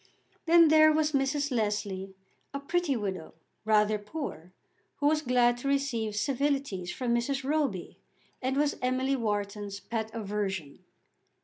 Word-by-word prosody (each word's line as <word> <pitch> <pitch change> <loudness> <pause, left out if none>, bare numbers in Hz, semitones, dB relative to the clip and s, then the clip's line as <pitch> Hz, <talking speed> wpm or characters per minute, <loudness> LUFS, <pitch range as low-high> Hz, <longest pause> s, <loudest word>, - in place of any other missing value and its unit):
Then 335 -1 +7
there 310 0 +7
was 305 0 +1
Mrs. 285 +1 0
Leslie, 205 -4 -2 0.4
a - - -2
pretty 315 0 0
widow, 190 -7 -4 0.3
rather 215 -1 +3
poor, 205 - -7 0.4
who 285 - -3
was 305 +1 +3
glad 245 -3 +3
to 275 - -4
receive 265 -6 0
civilities 270 -6 -1
from 245 -2 -1
Mrs. 270 +3 -1
Roby, 275 - -1 0.4
and 265 +1 -1
was 290 0 +1
Emily 260 +2 +1
Wharton's 205 -3 -3
pet 220 0 -4
aversion. 195 -8 -4
245 Hz, 130 wpm, -29 LUFS, 205-280 Hz, 0.4 s, Then